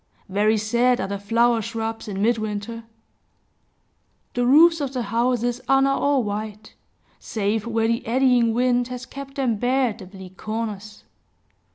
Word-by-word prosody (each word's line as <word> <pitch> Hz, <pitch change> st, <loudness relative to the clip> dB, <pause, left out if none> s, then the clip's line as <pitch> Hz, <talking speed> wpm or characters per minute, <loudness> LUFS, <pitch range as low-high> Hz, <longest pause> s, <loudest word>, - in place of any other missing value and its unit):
Very 210 Hz, +3 st, +2 dB
sad 240 Hz, +4 st, +2 dB
are 190 Hz, -, -2 dB
the 200 Hz, 0 st, -4 dB
flower 230 Hz, +3 st, +2 dB
shrubs 225 Hz, +1 st, -4 dB
in 200 Hz, -1 st, -3 dB
midwinter! 220 Hz, 0 st, -2 dB, 1.5 s
The 245 Hz, 0 st, 0 dB
roofs 325 Hz, +4 st, +6 dB
of 275 Hz, -2 st, -3 dB
the 250 Hz, -2 st, -2 dB
houses 240 Hz, +2 st, 0 dB
are 270 Hz, -, +5 dB
now 275 Hz, 0 st, +2 dB
all 280 Hz, -3 st, +2 dB
white, 210 Hz, 0 st, -5 dB, 0.5 s
save 215 Hz, 0 st, -2 dB
where 225 Hz, -1 st, +1 dB
the 230 Hz, 0 st, 0 dB
eddying 245 Hz, -1 st, +3 dB
wind 245 Hz, +1 st, +1 dB
has 250 Hz, 0 st, -7 dB
kept 275 Hz, +1 st, -9 dB
them 250 Hz, -6 st, 0 dB
bare 250 Hz, +3 st, +1 dB
at 220 Hz, +1 st, -8 dB
the 190 Hz, -, -10 dB
bleak 190 Hz, -1 st, -12 dB
corners. 215 Hz, -2 st, -5 dB
230 Hz, 155 wpm, -23 LUFS, 215-250 Hz, 1.5 s, roofs